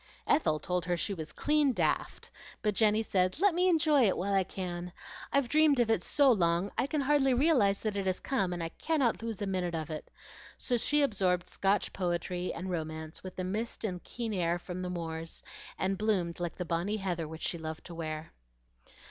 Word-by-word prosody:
Ethel 280 - +3
told 180 0 -1
her 175 -1 0
she 200 - -1
was 160 -4 -6
"clean 295 -2 +2
daft;" - - -1 0.3
but 210 -1 +2
Jenny 215 +1 +3
said, 185 +2 +1
"Let 400 -1 +4
me 360 +2 +3
enjoy 305 -7 +4
it 190 - +1
while 200 +2 -1
I 195 -1 +4
can. 180 -1 -5 0.4
I've 280 -3 +2
dreamed 300 0 +4
of 230 -2 +3
it 220 - +2
so 285 -3 +4
long 175 -2 +2
I 265 - +1
can 295 +1 0
hardly 270 -2 +3
realize 245 -9 +3
that 215 -2 -2
it 195 -1 -1
has 185 - 0
come, 195 -10 0
and 175 -1 -3
I 165 - -2
cannot 275 - 0
lose 225 -2 -4
a - - 0
minute 180 -3 -1
of 160 -1 -4
it;" 155 - -6 0.5
so 250 - 0
she 290 +5 +2
absorbed 185 -8 +1
Scotch 195 0 0
poetry 180 0 -2
and 185 +2 -5
romance 160 -2 -4
with 185 - -8
the 185 - -3
mist 215 +7 -3
and 190 -5 -1
the - - -31
keen 230 -3 -4
air 175 -2 +1
from 180 +1 -6
the 180 - -3
moors, 165 -2 -5 0.3
and 190 0 -1
bloomed 190 -6 0
like 175 -1 -3
the 180 - -4
bonnie 175 +6 -1
heather 175 -5 -2
which 160 +1 -8
she 170 - -2
loved 160 0 -6
to 175 - -8
wear. 155 -1 -5
190 Hz, 210 wpm, -31 LUFS, 175-235 Hz, 0.5 s, Let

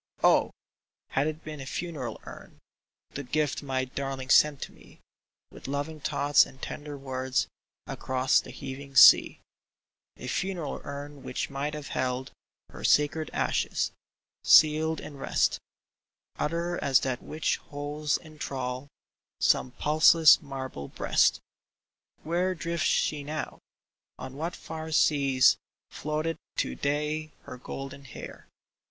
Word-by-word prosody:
Oh! - - +5 0.6
had 140 +3 +1
it 155 0 -5
been 155 -2 -7
a 135 - -8
funeral 155 -6 -4
urn - - -12 0.3
— - - -66
The 145 - -4
gift 145 +2 -1
my 130 -2 -1
darling 135 0 -5
sent 150 -2 +5
to - - -8
me - - -19 0.5
With - - -11
loving 145 +3 -3
thoughts 145 0 +4
and 130 - -11
tender 145 +1 -6
words 130 -1 -1 0.4
Across 130 0 +1
the - - -12
heaving 135 0 -8
sea - - +8 0.4
— - - -66
A - - -9
funeral 180 -6 -3
urn 145 0 -7
which 130 +2 -4
might 145 +2 -3
have 150 -1 -7
held 130 0 -2 0.4
Her - - -10
sacred 150 +2 +2
ashes, - - 0 0.5
sealed 155 +1 +5
in 145 - -9
rest 135 - +1 0.8
Utter 170 +3 -1
as 135 -3 +4
that 130 -2 -2
which 155 0 -1
holds 145 +1 -3
in 155 -2 -15
thrall 130 -1 -4 0.5
Some - - +3
pulseless 155 +4 +6
marble 130 - -6
breast! - - +2 0.8
Where 180 +3 0
drifts 170 0 -1
she 150 -2 +1
now? 155 +2 -5 0.6
On 130 - -8
what 165 +5 -4
far 160 0 -7
seas 140 -4 +4 0.3
Floateth 155 +2 -2 0.2
to 65 - -1
day 150 - -2
her 125 - -9
golden 135 +2 -8
hair? 120 - -10
145 Hz, 135 wpm, -28 LUFS, 135-155 Hz, 0.8 s, sea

